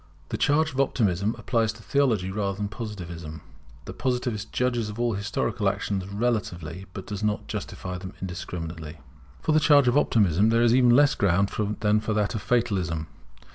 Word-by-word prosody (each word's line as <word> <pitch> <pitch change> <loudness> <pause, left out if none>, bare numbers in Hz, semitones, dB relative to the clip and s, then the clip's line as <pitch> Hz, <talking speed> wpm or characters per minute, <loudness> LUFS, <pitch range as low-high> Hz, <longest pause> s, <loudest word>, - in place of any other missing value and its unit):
[The - - -2
charge 155 +2 +2
of 130 - -5
Optimism 105 -5 +1
applies 115 -3 0
to 115 +1 -15
Theology 115 -10 +1
rather 100 -1 -2
than 105 0 -2
to 100 - -12
Positivism. 85 -8 -7 0.4
The - - -7
positivist 125 -4 -2
judges 120 -3 0
of 105 +2 -7
all 120 -1 +1
historical 100 0 -1
actions 95 -2 -3
relatively, 100 -5 -2
but 95 - -7
does 105 -1 -5
not 105 -1 -1
justify 90 0 -5
them 95 0 -8
indiscriminately] 85 -3 -6 0.5
For - - +1
the 155 - +5
charge 145 -4 +5
of 120 - +3
Optimism 105 - +3
there 115 +1 +3
is 120 -1 +4
even 125 -1 +5
less 140 +4 +6
ground 100 +1 +2 0.3
than 105 0 +3
for 110 0 -2
that 105 -1 +1
of 110 - -3
Fatalism. 95 -8 0
105 Hz, 175 wpm, -26 LUFS, 95-120 Hz, 0.5 s, less